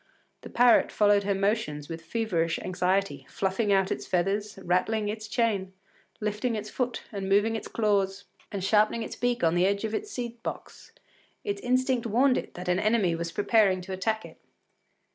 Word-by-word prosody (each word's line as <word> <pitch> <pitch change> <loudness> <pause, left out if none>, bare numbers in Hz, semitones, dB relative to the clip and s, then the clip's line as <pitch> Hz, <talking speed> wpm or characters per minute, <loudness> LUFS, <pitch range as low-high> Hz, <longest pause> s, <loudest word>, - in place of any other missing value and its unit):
The - - -10
parrot 245 -1 +4
followed 205 -1 +3
her 200 -1 +1
movements 195 -8 -1
with 165 -1 -6
feverish 170 -5 -1
anxiety, 185 -6 -1
fluffing 200 +2 0
out 195 -1 +3
its - - -3
feathers, 200 +4 -1
rattling 205 +4 +1
its 215 0 -5
chain, 210 -5 0 0.5
lifting 210 +3 -1
its 215 0 -5
foot, 245 -2 -2
and 195 -2 -4
moving 205 +3 +3
its 220 - -5
claws, 200 -3 0 0.3
and 195 -2 -4
sharpening 215 +3 +3
its - - -6
beak 245 -3 -1
upon 165 0 +4
the 175 +2 +3
edge 200 +1 0
of 220 -1 -2
its 415 - -3
seed 240 - -5
box. - - -7 0.5
Its 405 -1 -3
instinct 255 -1 +1
warned 250 +4 +3
it - - -10
that 180 +1 -7
an 180 +1 +2
enemy 210 -4 +2
was 165 0 -3
preparing 205 -2 +3
to 190 +1 -7
attack 220 +4 -1
it. - - -14
205 Hz, 180 wpm, -27 LUFS, 190-225 Hz, 0.5 s, parrot